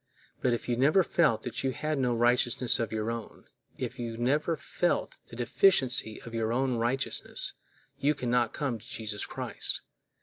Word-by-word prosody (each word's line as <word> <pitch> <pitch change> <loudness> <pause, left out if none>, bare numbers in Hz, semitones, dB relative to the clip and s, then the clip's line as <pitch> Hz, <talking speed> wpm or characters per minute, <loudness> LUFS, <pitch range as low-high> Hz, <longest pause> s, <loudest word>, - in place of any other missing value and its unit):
But 125 - +2
if 120 - -2
you 120 - +1
never 150 +10 +4
felt 115 -11 +2
that 125 +1 -3
you 135 -1 0
had 155 +1 -2
no 125 -2 +1
righteousness 120 +1 +3
of 115 -2 -1
your 110 +1 -1
own, 115 -2 -7 0.3
if - - -5
you 115 -1 -4
never 145 +7 +1
felt 175 +4 -1
the - - -11
deficiency 125 - +3
of 115 - -9
your 115 -1 0
own 130 0 +1
righteousness, 120 +4 -1 0.5
you 150 +2 +2
can 125 -3 -2
not 120 -2 +2
come 135 -6 -2
to 115 - -16
Jesus 110 -5 -4
Christ. - - -2
120 Hz, 175 wpm, -29 LUFS, 115-135 Hz, 0.5 s, never